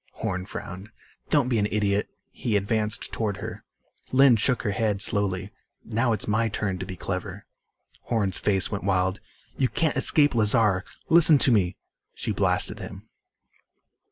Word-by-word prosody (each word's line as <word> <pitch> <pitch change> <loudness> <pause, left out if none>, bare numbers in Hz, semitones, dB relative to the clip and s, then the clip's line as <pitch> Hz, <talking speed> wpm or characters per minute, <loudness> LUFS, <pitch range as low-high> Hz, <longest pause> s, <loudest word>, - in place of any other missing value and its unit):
Horn 90 0 -4
frowned. 95 +3 -8 0.4
"Don't - - +2
be 120 -3 +1
an 105 - +1
idiot." 105 -1 0 0.2
He 110 -4 -1
advanced 105 +1 -2
toward 105 -3 -2
her. 105 +1 -8 0.5
Lynn 130 -1 +6
shook 125 +3 0
her 105 - -1
head 105 0 -1
slowly. 100 -2 0 0.3
"Now 115 +2 0
it's 110 - -1
my 110 +2 +1
turn 100 -3 -3
to - - -6
be 95 - -6
clever." 95 +2 -5 0.6
Horn's 100 -6 0
face 95 -1 +1
went 100 - -4
wild. 95 0 0 0.4
"You 130 -2 +1
can't 160 -2 0
escape 145 -1 +4
Lazar! 105 -4 +2 0.3
Listen 160 -2 +7
to 135 - +4
me 95 -5 +2 0.2
" - - -57
She - - -3
blasted - - 0
him. - - -10
105 Hz, 155 wpm, -25 LUFS, 95-115 Hz, 0.6 s, Listen